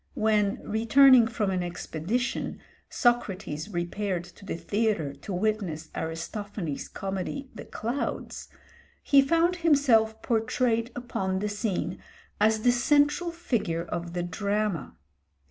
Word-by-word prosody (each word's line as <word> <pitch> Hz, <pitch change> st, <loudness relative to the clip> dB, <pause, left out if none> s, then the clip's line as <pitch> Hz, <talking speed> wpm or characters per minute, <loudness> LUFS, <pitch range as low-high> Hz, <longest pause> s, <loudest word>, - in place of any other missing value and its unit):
When, 210 Hz, -2 st, +1 dB
returning 235 Hz, +3 st, +6 dB
from 215 Hz, -3 st, -1 dB
an 185 Hz, -1 st, 0 dB
expedition, 175 Hz, +6 st, -3 dB, 0.3 s
Socrates 210 Hz, -9 st, 0 dB
repaired 180 Hz, 0 st, -2 dB
to 175 Hz, +3 st, -16 dB
the 195 Hz, -, -3 dB
theatre 205 Hz, -7 st, 0 dB
to 200 Hz, -, -9 dB
witness 180 Hz, -5 st, -1 dB
Aristophanes' 165 Hz, 0 st, -4 dB
comedy 195 Hz, +8 st, -5 dB
'The 225 Hz, -, -9 dB
Clouds,' 240 Hz, +6 st, -4 dB, 0.5 s
he 280 Hz, -1 st, +6 dB
found 335 Hz, +5 st, +2 dB
himself 260 Hz, -9 st, +3 dB
portrayed 230 Hz, 0 st, +1 dB
upon 190 Hz, -6 st, -2 dB
the 210 Hz, +2 st, -1 dB
scene 205 Hz, -2 st, -2 dB, 0.4 s
as 215 Hz, +1 st, +3 dB
the 245 Hz, -, +5 dB
central 290 Hz, +7 st, +3 dB
figure 235 Hz, -, -1 dB
of 170 Hz, 0 st, -5 dB
the 175 Hz, -1 st, -2 dB
drama. 200 Hz, -1 st, -2 dB
215 Hz, 115 wpm, -27 LUFS, 180-240 Hz, 0.5 s, returning